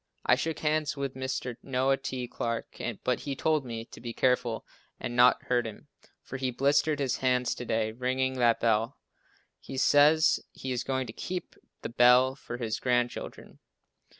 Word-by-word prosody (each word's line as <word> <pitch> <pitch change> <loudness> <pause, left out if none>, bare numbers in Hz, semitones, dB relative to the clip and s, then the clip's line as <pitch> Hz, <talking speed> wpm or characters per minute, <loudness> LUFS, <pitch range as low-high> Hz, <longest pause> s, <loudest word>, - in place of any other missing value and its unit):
I - - +5
shook 160 +5 0
hands 155 -1 0
with 140 -1 -3
Mr. 130 -2 -4
Noah 135 0 +1
T. 130 -2 -4
Clarke, 115 -1 -4 0.2
but 125 -2 0
he 140 -2 -4
told 155 +1 +1
me 115 -2 -6
to - - -13
be 120 -1 -5
careful 125 -3 0 0.3
and 120 - -4
not 125 +1 +5
hurt 120 -2 0
him, 115 +7 -11 0.3
for 135 - -6
he 130 -1 -1
blistered 145 +4 +2
his 135 -3 -1
hands 125 -1 +1
to 125 - -7
day 110 -1 0
ringing 130 +2 -1
that 120 -2 +3
bell. 115 +3 +1 0.6
He 135 - -8
says 150 +4 +5
he 130 - -6
is 125 -2 -1
going 130 -1 -1
to 110 - -8
keep 180 +7 -5 0.3
the - - -3
bell 125 +2 +5
for 125 -2 -8
his 115 -3 -3
grandchildren. 120 -1 -2
125 Hz, 175 wpm, -29 LUFS, 120-135 Hz, 0.6 s, I